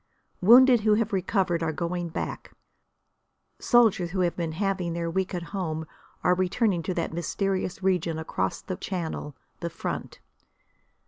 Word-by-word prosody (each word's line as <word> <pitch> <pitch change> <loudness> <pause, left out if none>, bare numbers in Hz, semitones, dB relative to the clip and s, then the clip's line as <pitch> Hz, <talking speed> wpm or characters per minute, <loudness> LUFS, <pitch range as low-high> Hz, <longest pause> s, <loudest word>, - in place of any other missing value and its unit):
Wounded 245 +4 +7
who 210 0 +4
have 225 0 0
recovered 185 -2 +1
are 165 -1 0
going 170 +2 -3
back; - - -5 1.1
soldiers 220 -7 +4
who 185 +1 -1
have 175 -1 +1
been 165 -2 -3
having 185 -1 -1
their 170 0 -2
week 190 +1 -1
at 175 - -3
home 160 -5 -2 0.4
are 180 - +4
returning 185 +1 +1
to 180 +2 -3
that 170 -1 -2
mysterious 185 +2 -2
region 175 -4 +1
across 160 - -2
the 185 - -4
Channel, 160 -6 -4 0.2
the 170 - -3
front. - - -5
180 Hz, 145 wpm, -26 LUFS, 170-195 Hz, 1.1 s, Wounded